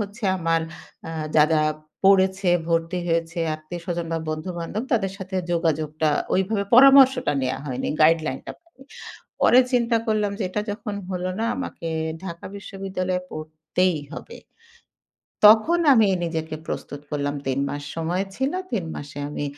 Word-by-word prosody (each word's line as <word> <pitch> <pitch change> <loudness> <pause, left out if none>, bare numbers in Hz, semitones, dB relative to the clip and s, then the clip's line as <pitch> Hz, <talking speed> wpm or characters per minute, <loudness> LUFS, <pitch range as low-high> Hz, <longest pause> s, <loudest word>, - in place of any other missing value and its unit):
হচ্ছে 210 +2 -5
আমার 165 -1 +1 0.5
আ - - -5 0.3
যারা 155 +1 +5 0.4
পড়েছে, 190 -1 +4 0.2
ভর্তি 165 +2 0
হয়েছে 165 0 -1 0.2
আত্মীয়স্বজন 170 +2 -5
বা 165 - 0
বন্ধু-বান্ধব, 170 +5 -4
তাদের 195 -5 +1
সাথে 190 -1 -5 0.2
যোগাযোগটা 155 -2 0 0.3
ওইভাবে 200 +2 0
পরামর্শটা 265 - +7
নেওয়া 130 0 -1
হয়নি 130 -1 -3
গাইডলাইনটা। 155 -3 +2 0.9
পরে 250 - +7
চিন্তা 235 -1 +3
করলাম 210 -2 +1
যে - - -1
এটা 210 +3 -2
যখন 205 0 -5
হলো 180 0 -2
না, 225 - 0
আমাকে 215 -10 -5 0.4
ঢাকা 170 -2 -7
বিশ্ববিদ্যালয়ে 190 -2 -3
পড়তেই 155 +3 -1 0.2
হবে। 465 - -9 1.1
তখন 220 +11 +7
আমি 225 -4 +5 0.2
নিজেকে 160 -2 -3
প্রস্তুত 145 - -5
করলাম। 145 -1 -2
৩ 135 0 0
মাস 145 - -5
সময় 170 +4 -1
ছিল। 265 +3 0 0.2
৩ 195 -7 -1
মাসে 145 0 -8
আমি 145 0 -4
180 Hz, 130 wpm, -23 LUFS, 160-205 Hz, 1.1 s, পরামর্শটা